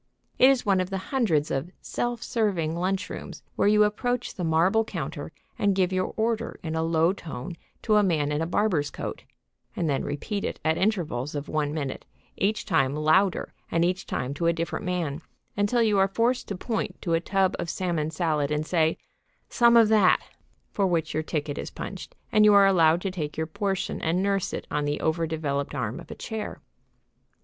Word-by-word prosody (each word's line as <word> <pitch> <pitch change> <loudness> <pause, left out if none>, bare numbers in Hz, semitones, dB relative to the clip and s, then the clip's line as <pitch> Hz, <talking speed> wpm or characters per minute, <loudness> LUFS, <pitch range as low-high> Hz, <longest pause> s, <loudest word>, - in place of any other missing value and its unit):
It 260 - +8
is 270 -2 +2
one 195 -2 +3
of 185 - -3
the 195 - -2 0.2
hundreds 170 - +2
of 135 +5 -2
"self 240 -1 -3
serving" 190 -9 0
lunchrooms, 185 +3 -3
where - - +2
you 210 0 +5
approach 245 +4 -1
the 180 - -5
marble 170 +7 +3
counter 225 - -5 0.3
and 200 -1 +2
give 190 -1 +1
your 185 0 0
order 225 0 -1
in 160 -2 -3
a 160 - 0
low 165 +2 +2
tone 165 -3 -7 0.3
to 215 -2 +3
a - - +6
man 155 -7 +1
in 150 +1 0
a 165 - -1
barber's 175 -6 +1
coat, - - -6 0.5
and 170 - -1
then 140 -3 0
repeat 200 +8 -3
it - - -3
at 160 0 +3
intervals 160 - -1
of 145 +1 -4
one 150 -2 -1
minute, 145 -4 -4 0.3
each 210 +2 0
time 140 -7 +2
louder 155 +5 +2 0.2
and 165 +1 +2
each 180 +1 -1
time 130 +2 -2
to 170 +4 -1
a 170 - +4
different 170 +4 -3
man, 170 -4 -2 0.3
until 205 +4 +2
you 210 -3 +3
are 195 - +5
forced 230 +5 0
to 200 - -3
point 220 +3 -3
to 170 - 0
a 165 - +3
tub 190 +2 +1
of 170 - -3
salmon 170 -4 -1
salad 155 -3 0
and 150 +1 -1
say, 160 -1 +1 0.5
"Some 235 -1 +5
of 230 -2 +7
that," 210 -4 +5 0.5
for 200 -2 +1
which 165 -3 0
your 155 - 0
ticket 150 -2 -3
is - - -5
punched - - -8 0.2
and 215 - +5
you 210 -1 +7
are 200 -1 +7
allowed 170 -3 +4
to 195 - -2
take 155 -5 -5
your 160 - 0
portion 195 +3 -2
and 170 +4 +1
nurse 195 -1 0
it - - -5
on 150 0 0
the 145 0 -1
over 160 +1 0
developed 145 -3 -2
arm - - -3
of - - -12
a - - -7
chair. 220 -2 -5
175 Hz, 200 wpm, -26 LUFS, 155-205 Hz, 0.5 s, It